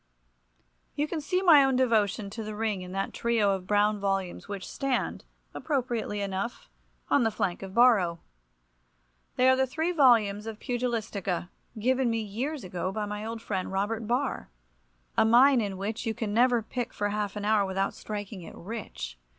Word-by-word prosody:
You 295 +1 0
can 315 0 -3
see 365 +6 0
my 310 -6 +8
own 270 -1 +2
devotion 220 -5 +1
to 225 - -6
the 215 0 -6
ring 210 -3 -1
in 180 0 -8
that 195 0 -2
trio 230 -4 +2
of 185 -1 -5
brown 210 +1 +2
volumes 195 -2 -2
which 200 -2 -6
stand, 275 -2 -2 0.3
appropriately 240 -7 -2
enough, 200 +4 -4 0.3
upon 285 - +3
the 225 - +3
flank 180 -4 -2
of 190 -1 -8
Borrow. 215 -9 +5 1.2
They 255 - +4
are 260 - +6
the 265 0 +1
three 320 +6 -1
volumes 225 - +4
of 220 -1 -5
"Pugilistica," 225 -8 -2 0.3
given 255 +3 +2
me 230 0 0
years 240 +8 -4
ago 185 0 -3
by 210 +1 -2
my 210 0 -5
old 225 +1 -5
friend, 190 -3 -3
Robert 210 +3 -2
Barr, 250 - -1 0.7
a - - +5
mine 245 +3 +6
in 200 -3 -3
which 210 +4 -4
you 220 - -1
can 220 -4 -3
never 240 0 +3
pick 245 +2 -4
for 205 0 0
half 205 -1 -2
an 205 -1 -4
hour 215 -1 +3
without 195 0 -1
striking 205 -2 -6
it 165 - -10
rich. 170 - -7
215 Hz, 175 wpm, -28 LUFS, 200-245 Hz, 1.2 s, my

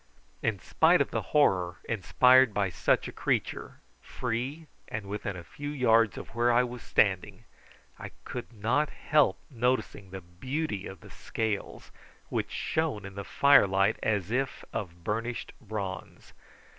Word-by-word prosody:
In 110 -2 0
spite 85 - +3
of - - 0
the - - -1
horror 90 - +2
inspired 125 +3 +4
by 100 -3 +1
such - - +1
a - - -6
creature, - - -2 0.2
free 125 - -4 0.2
and 105 -1 -5
within 100 0 -4
a 85 - -8
few 145 +10 -7
yards 115 -7 +3
of - - -8
where 120 +1 +2
I 120 +1 +4
was 125 -1 -6
standing, 95 -4 +1 0.6
I - - -7 0.2
could 125 0 -6
not 120 +7 0
help 150 -2 +2
noticing 125 -5 -1
the 95 0 -7
beauty 105 - -4
of 95 - -10
the - - -14
scales, 110 -3 -4 0.4
which - - -2
shone 155 -11 -2
in 100 - -8
the 100 +1 -6
fire 140 -1 +5
light 95 +3 +2
as 105 -2 0
if 130 +1 -2
of 85 -5 -5
burnished 115 +5 -3
bronze. 100 -5 -6
110 Hz, 150 wpm, -29 LUFS, 100-125 Hz, 0.6 s, fire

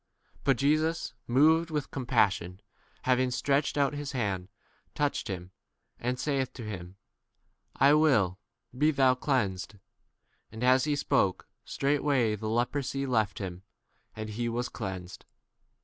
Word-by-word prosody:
But 135 -3 +3
Jesus, 155 +2 +1
moved 160 +6 +4
with 150 -3 -3
com 130 -3 -5
passion, 95 -6 +1 0.4
having 130 0 +2
stretched 140 +3 0
out 140 0 +2
his 145 -1 -5
hand, 100 -7 -2 0.5
touched 145 -6 -1
n 95 - -1
him, 90 +1 -12 0.5
and 125 +1 -2
saith 135 -4 -1
to 120 - -8
42 105 -2 -4
him, 90 +2 -12 0.8
I 140 +2 +5
will, 120 - +3 0.4
be 150 +4 +3
thou 135 -4 +4
cleansed. 110 - -1 0.8
And 110 +2 -6
as 130 +1 +4
he 150 -1 +1
spoke, 100 -8 +1 0.2
straightway 140 -5 +1
the 110 +1 -5
lepro 120 +5 0
sy 135 +1 -2
left 110 -6 0
him, 90 -3 -5 0.5
and 110 -1 -5
he 120 +2 -2
was 120 +1 -2
cleansed. 90 -2 -6
125 Hz, 145 wpm, -29 LUFS, 105-140 Hz, 0.8 s, I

